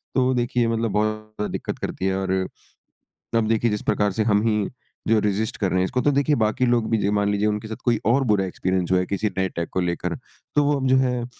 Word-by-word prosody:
तो 130 0 +3
देखिए 120 -1 +1
मतलब 115 -1 0
बहुत 105 +1 +2
ज़्यादा 110 -1 -5
दिक्कत - - -4
करती 95 - -4
है 95 0 +1
और 95 -1 -2 1.1
अब 110 -1 +2
देखिए 115 0 +2
जिस 105 - -2
प्रकार 105 -2 +1
से 110 - 0
हम 105 -1 +3
ही 105 -3 +1 0.4
जो 115 - +5
है 110 - +4
रेज़िस्ट 105 +4 -1
कर 95 -3 0
रहे 95 - +1
हैं, 95 - +2
इसको 125 +6 -1
तो 145 - +3
देखिए 145 +2 +2
बाकी 110 +3 +1
लोग 120 -2 +1
भी 115 - +2
ज 100 - 0
मान 100 0 +1
लीजिए 105 +1 +1
उनके 105 +1 -2
साथ 110 - -5
कोई 120 -3 +2
और 135 +4 +3
बुरा 95 -2 +2
एक्सपीरियंस 95 0 -1
हुआ 90 - +4
है 90 - -2
किसी 100 +2 -1
नए 95 0 +1
टेक 85 -1 -2
को 95 - 0
लेकर 85 -1 -2 0.4
तो 145 - +5
वो 145 0 +2
अब 135 - -1
जो 130 - +5
है 125 -2 0
110 Hz, 260 wpm, -23 LUFS, 100-120 Hz, 1.1 s, जो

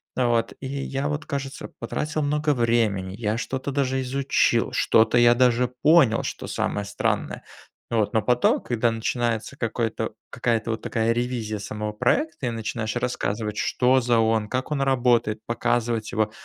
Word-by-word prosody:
вот, 120 -2 +1
и 135 - -8
я 135 +1 -3
вот, 150 +1 -3
кажется, 140 -1 -4
потратил 155 0 -2
много 150 0 +1
времени, 110 -6 +1
я 110 0 -1
что-то 130 +3 -3
даже 135 -1 0
изучил, 135 +1 +1
что-то 110 +2 +4
я 120 0 +6
даже 125 0 +3
понял, 125 -1 +4
что - - -5
самое 105 - -2
странное, 100 - -2 0.5
вот. 110 0 +1
Но 110 - +3
потом, 125 0 +3
когда 120 -1 0
начинается 115 +1 -2
какой-то 115 -2 -2 0.2
какая-то 115 -1 0
вот 110 - -3
такая 115 0 0
ревизия 120 -3 -2
самого 105 +1 -4
проекта 155 +6 0
и - - +1
начинаешь 110 0 -3
рассказывать, 110 -3 -2
что 130 +1 +2
за 120 -1 +2
он, 110 -1 +2
как 130 +3 -3
он 140 -2 0
работает, 120 -5 +2
показывать 115 -1 -1
его, 110 -1 0
120 Hz, 155 wpm, -24 LUFS, 110-130 Hz, 0.5 s, я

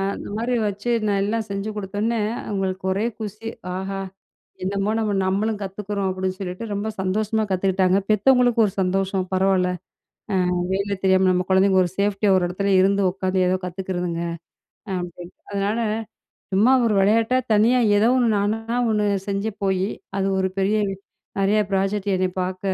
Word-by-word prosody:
அந்த - - -8
மாரி 245 +2 0
வச்சி 205 +4 -4 0.2
நான் 200 -1 +1
எல்லாம் 220 +2 -1
செஞ்சி 200 +2 -3
கொடுத்தவுனே 210 +3 -1 0.3
அவுங்களுக்கு 190 -2 -2
ஒரே 200 +4 -1
குஷி. 215 +1 -5 0.3
ஆஹா! 195 +1 -4 0.7
என்னமா 200 +2 -1
நம்ம 215 -2 0
நம்மளும் 205 +3 0
கத்துக்குறோம் 200 0 -3
அப்பிடின்னு 185 0 -2
சொல்லிட்டு, 185 +3 -5
ரொம்ப 205 +2 -2
சந்தோஷமா 215 +3 0
கத்துக்கிட்டாங்க. 190 0 +2
பெத்தவங்களுக்கு 245 +2 +4
ஒரு 195 - -4
சந்தோஷம் 190 0 0
பரவால்ல, 190 -1 +2 0.8
அ, - - 0 0.2
வேல 200 +1 -1
தெரியாம 190 0 +4
நம்ம 180 0 +1
கொழந்தைங்க 190 0 +4
ஒரு 175 - -3
சேஃப்டியா 205 0 +1
ஒரு 180 -1 +2
எடத்துல 200 +2 -1
இருந்து 200 +1 +3
உக்காந்து 185 0 0
ஏதோ 185 - +1
கத்துக்கிறதுங்க 180 -2 -3 0.8
அப்பிடின்னு. 175 0 -7 0.2
அதனால 200 +3 -1 0.7
சும்மா 210 +7 +5
ஒரு 225 - +2
வெளையாட்டா 225 +5 +3 0.2
தனியா 225 +4 +4 0.2
ஏதோ 215 +2 +4
ஒன்னு 245 -2 +3
நானா 225 +3 -1
ஒன்னு 210 -1 +1 0.2
செஞ்ச 200 +2 -1 0.2
போயி, 190 0 +1 0.3
அது 195 0 +1
ஒரு 190 0 +1
பெரிய 195 +2 +2 0.6
நெறையா 205 +2 +3
ப்ராஜெக்ட் 195 +1 0
என்ன 185 - +1 0.2
பாக்க 185 0 -3
195 Hz, 150 wpm, -22 LUFS, 190-210 Hz, 0.8 s, சும்மா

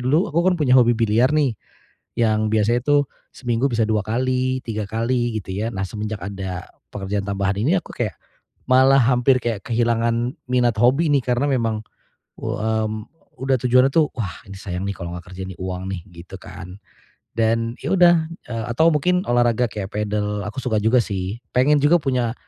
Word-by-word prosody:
Dulu 155 +11 +2
aku 165 - 0
kan 185 - +4
punya 130 -3 +4
hobi 120 -1 +5
biliar 115 +3 +3
nih, 145 -6 +2 0.6
yang 110 -2 +2
biasanya 115 +3 +2
tuh 145 -1 +3 0.3
seminggu 120 +1 -1
bisa 115 -1 +1
2 105 -2 +1
kali, 130 +2 0
3 110 -2 -3
kali, 120 +1 -1
gitu - - -10
ya. 110 +2 -1
Nah, 95 - -3
semenjak 105 0 -5
ada 95 -2 -5 0.3
pekerjaan 100 0 -3
tambahan 100 0 -1
ini 150 - +2
aku - - -10
kayak, 110 -8 -2 0.6
malah 130 +1 +6
hampir 125 +2 +3
kayak 115 -4 -3
kehilangan 115 0 +1 0.2
minat 125 -3 +2
hobi 135 +8 +3
nih 145 - +5
karena 125 +3 +1
memang 115 -4 0 0.6
u - - -3
m 110 0 -1 0.4
udah 135 0 +2
tujuannya 125 +1 +4
tuh, 155 -3 +3
"Wah, 100 -6 -5
ini 100 - -9
sayang 90 -1 -5
nih 100 - -2
kalau 85 0 -6
enggak 90 +1 -12
kerja 95 - -6
nih 95 - -9
uang 95 0 -4
nih," 95 - -4 0.2
gitu 90 - -11
kan. 90 0 -10 0.6
Dan 115 0 +1
ya 155 +7 -1
udah, 175 -2 +5 0.2
eee, 115 -2 -4
atau 160 +8 +4
mungkin 180 +5 +1
olahraga 120 0 +2
kayak 100 -2 -5
padel 105 0 -2
aku 130 - -5
suka 110 -4 0
juga 115 +4 +4
sih 100 +2 -4 0.2
pengen 145 +4 +4
juga 170 +4 +5
punya, 125 -4 0
115 Hz, 180 wpm, -21 LUFS, 105-130 Hz, 0.6 s, malah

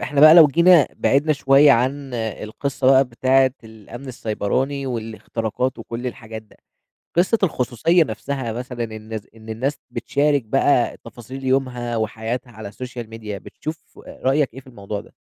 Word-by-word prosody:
إحنا 145 -1 -1
بقى 155 +1 +10
لو 165 -3 +9
جينا 170 +1 +5
بعِدنا 145 +3 +2
شوية 140 0 +5
عن 130 +2 -1
القصة 115 +4 -3
بقى 135 +1 +6
بتاعة 130 +2 +2
الأمن 110 +4 -11
السيبراني 130 +4 -2
والاختراقات 115 +1 -3
وكل 115 +2 -6
الحاجات 115 -3 -7
ده، 110 - -24 0.6
قصة 185 +7 +3
الخصوصية 160 - +2
نفسها 130 -1 -4
مثلًا 125 0 -5
إن 110 +1 -6
س 105 - -24
إن 110 0 -14
الناس 130 +7 -2
بتشارك 140 +3 0
بقى 125 +2 +2
تفاصيل 120 +4 -10
يومها 125 -3 -1
وحياتها 110 +3 -3
على 110 -2 -9
السوشيال 120 +1 -8
ميديا 110 -2 -7
بتشوف 155 +10 -9
رأيك 135 0 0
إيه 130 - -9
في 130 - -18
الموضوع 100 -4 -6
ده؟ - - -20
125 Hz, 150 wpm, -21 LUFS, 110-140 Hz, 0.6 s, بقى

